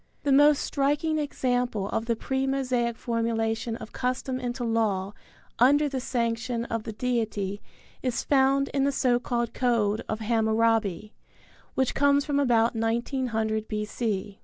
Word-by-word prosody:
The 285 - +1
most 290 +1 +5
striking 295 +3 0
example 245 -7 -1
of 225 - -2
the 230 - +1
pre 265 +4 -2
Mosaic 250 -4 0
formulation 230 -1 -1
of 220 - -10
custom 255 +1 -2
into 245 0 -3
law 210 -4 0 0.5
under 290 +5 +5
the 270 -2 -3
sanction 235 -1 -2
of 230 -2 -4
the 225 - -4
deity 215 -4 -2 0.4
is 250 -2 -1
found 275 0 +3
in 275 -1 0
the 280 - +2
so 250 -3 +2
called 240 -1 -2
code 230 -4 +1
of 215 - -2
Hammurabi, 220 -3 +1 0.6
which 265 -1 +1
comes 285 0 +3
from 285 -2 0
about 235 -4 +3
1900 225 -1 -1
B.C. 210 -2 -3
235 Hz, 140 wpm, -26 LUFS, 225-265 Hz, 0.6 s, most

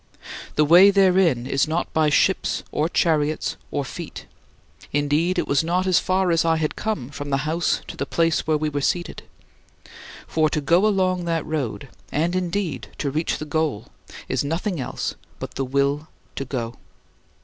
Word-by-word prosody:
The 150 - +4
way 175 +6 +8
therein 185 -10 +3
is 135 +2 +1
not 165 +3 -2
by 155 -1 +3
ships 145 - +2
or 155 +2 0
chariots 155 -3 +1
or - - -2
feet - - -8 0.7
indeed 150 +5 +1
it - - 0
was 140 +2 +2
not 180 +3 0
as 185 -2 +4
far 185 -1 +1
as 165 - +3
I 165 -1 +3
had 155 -1 -1
come 165 - -3
from 145 0 -6
the 135 0 0
house 160 +1 0
to - - -7
the 140 - -3
place 165 -2 +1
where 155 -1 +3
we 155 +1 -1
were 145 -1 -2
seated. 175 +5 -1 1.0
For 155 -1 +1
to 150 - -1
go 170 +8 +3
along 185 -3 +1
that 165 -2 -1
road 145 -3 -3 0.2
and 165 +5 0
indeed 185 -2 -2
to 140 - -2
reach 155 +4 -1
the 155 - -6
goal 150 -7 -1 0.4
is - - 0
nothing 165 +4 -2
else - - -3 0.2
but - - -7
the 135 - -2
will 140 +3 0 0.3
to 135 - -3
go. 120 -3 -4
155 Hz, 175 wpm, -23 LUFS, 145-175 Hz, 1.0 s, way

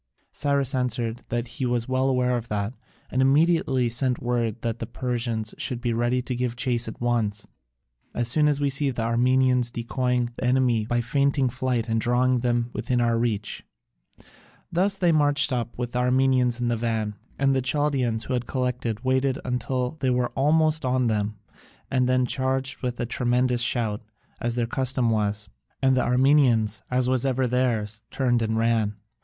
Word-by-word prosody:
Cyrus 140 -1 0
answered 125 -2 -1
that 120 0 -2
he 130 +2 -4
was 120 -1 -1
well 130 +1 +1
aware 125 -1 +1
of 120 -1 -4
that, 105 +1 -2 0.4
and 130 - +1
immediately 135 -2 +3
sent 120 +2 -1
word 120 -2 -1
that 115 0 -2
the 115 - -4
Persians 120 -3 -3
should 125 - -2
be 120 -1 -1
ready 120 +2 0
to 125 - -4
give 125 -1 -2
chase 120 -1 0
at 110 - -7
once, 115 -4 -1 0.7
"as 120 -1 0
soon 150 +5 +3
as 145 -1 +1
we 145 - +1
see 140 +1 +1
the 120 -3 -3
Armenians 125 +1 +2
decoying 125 0 -1
the - - -6
enemy 125 -3 +2
by 120 0 +1
feigning 140 +1 +1
flight 120 -2 -1
and 115 -1 0
drawing 125 +1 +2
them 120 0 0
within 120 +3 -1
our 120 -1 +2
reach." 110 -3 -2 1.1
Thus 195 +3 +1
they 175 -3 +3
marched 145 -2 +2
up 120 -1 -3
with 120 -1 -3
the 125 - -1
Armenians 125 -1 +2
in 120 - -1
the 120 - +1
van: 110 -2 -2 0.2
and 135 0 +2
the 130 - +1
Chaldaeans 130 -4 0
who 130 - -4
had 125 -1 -2
collected 125 -3 -2
waited 130 +1 +1 0.2
till 125 +3 -2
they 130 - 0
were 125 -1 +1
almost 155 +3 +2
on 130 0 +1
them, 105 -1 -1 0.5
and 125 -2 +2
then 130 0 +3
charged 130 +1 0
with 125 -1 -3
a - - -1
tremendous 125 +1 +1
shout, 115 -4 +1 0.4
as 120 0 -2
their 120 -1 0
custom 130 -1 +1
was, 105 -1 0 0.3
and 130 -1 +3
the 130 - +2
Armenians, 125 -5 +3
as 125 0 +1
was 130 -1 +1
ever 130 -1 +1
theirs, 115 -4 -1
turned 120 -3 +1
and 110 0 -1
ran. 110 -2 +1
125 Hz, 180 wpm, -25 LUFS, 115-130 Hz, 1.1 s, immediately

